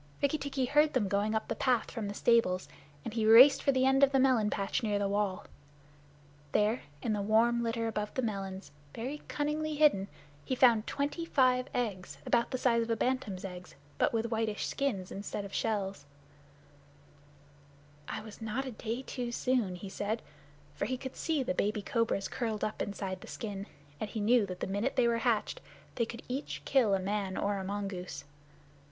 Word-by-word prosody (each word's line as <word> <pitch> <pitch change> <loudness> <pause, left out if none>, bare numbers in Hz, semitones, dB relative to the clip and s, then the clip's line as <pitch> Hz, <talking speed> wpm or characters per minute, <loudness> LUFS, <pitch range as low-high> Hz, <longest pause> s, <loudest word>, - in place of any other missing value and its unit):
Rikki 285 +2 +1
tikki 270 -2 -1
heard 295 +4 +3
them 230 -6 +1
going 205 +3 0
up 220 - -1
the - - -1
path 250 -4 +1
from 225 -4 -4
the 200 - -5
stables, 200 -7 +3 0.4
and 230 - -4
he 225 -1 0
raced 240 +6 +8
for 275 - +3
the 260 -1 +2
end 270 +1 +4
of 275 - +6
the 270 - +3
melon 255 -5 +4
patch 195 -2 -1
near 210 -3 0
the 200 0 0
wall. 200 -1 -1 1.1
There, 215 +4 +2 0.2
in 220 - 0
the 205 - -1
warm 230 +3 +3
litter 230 0 -1
above 210 -2 -2
the 260 - 0
melons, 195 -3 -4 0.2
very 265 +6 -4
cunningly 300 +1 -1
hidden, 290 -11 +4 0.4
he 260 - -1
found 235 -4 +5
twenty 290 +4 -2
five 255 -5 +3
eggs, 185 - -3
about 235 -1 +2
the 255 - -2
size 235 -2 +3
of 230 - -3
a 230 - +2
bantam's 225 -6 -1
eggs, 180 -1 -9 0.2
but - - +3
with 230 0 -1
whitish 220 -2 -1
skin 250 -10 -1
instead 200 +1 -5
of 195 - -10
shell. 200 -3 -1 2.1
"I - - -4
was 220 0 -11
not 225 +5 -2
a 260 - -4
day 235 +3 -4
too 245 -2 -4
soon," 240 -6 0
he 180 +3 -8
said, 210 +3 -3 0.5
for - - -2
he 255 - -2
could 260 0 -7
see 310 -4 0
the 270 +2 -1
baby 210 -3 0
cobras 230 -5 0
curled 225 -4 -3
up 215 - -2
inside 195 -2 -4
the - - -11
skin, 200 -2 -5 0.3
and 215 - -3
he 220 - -4
knew 215 0 +4
that 185 -1 -7
the - - 0
minute 205 +7 -1
they 250 -3 +4
were 230 0 +1
hatched 230 -3 0 0.3
they 230 -2 0
could 235 0 -8
each 265 +4 -4
kill 235 -8 +4
a - - 0
man 195 0 -2
or 200 0 0
a - - -4
mongoose. 195 -5 -4
225 Hz, 195 wpm, -31 LUFS, 200-255 Hz, 2.1 s, raced